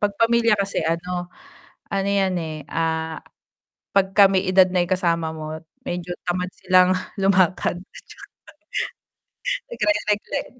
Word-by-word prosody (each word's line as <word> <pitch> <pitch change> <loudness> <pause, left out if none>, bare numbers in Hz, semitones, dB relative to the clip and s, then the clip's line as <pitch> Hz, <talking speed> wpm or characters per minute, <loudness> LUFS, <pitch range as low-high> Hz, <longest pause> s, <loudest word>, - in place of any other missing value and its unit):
'Pag 205 -1 +1
pamilya 230 0 +4
kasi, 200 0 -1
ano, 175 +2 -2 0.6
ano 195 0 0
'yan, 195 -2 +1
eh, 160 -1 -5 0.2
ah, 160 -1 -1 0.7
'pagka 195 +1 +5
may 190 -1 +2
edad 185 0 +6
na 180 -1 +1
'yong 175 - -4
kasama 170 -3 0
mo, 155 -1 -6 0.3
medyo 175 0 -4 0.2
tamad 180 +1 -1
silang 185 0 +4 0.3
lumakad. 185 -2 +2
At 185 - -14 1.5
saka - - -2 0.2
nagre 310 -1 +2
nagren 205 0 -2
185 Hz, 130 wpm, -22 LUFS, 170-195 Hz, 1.5 s, edad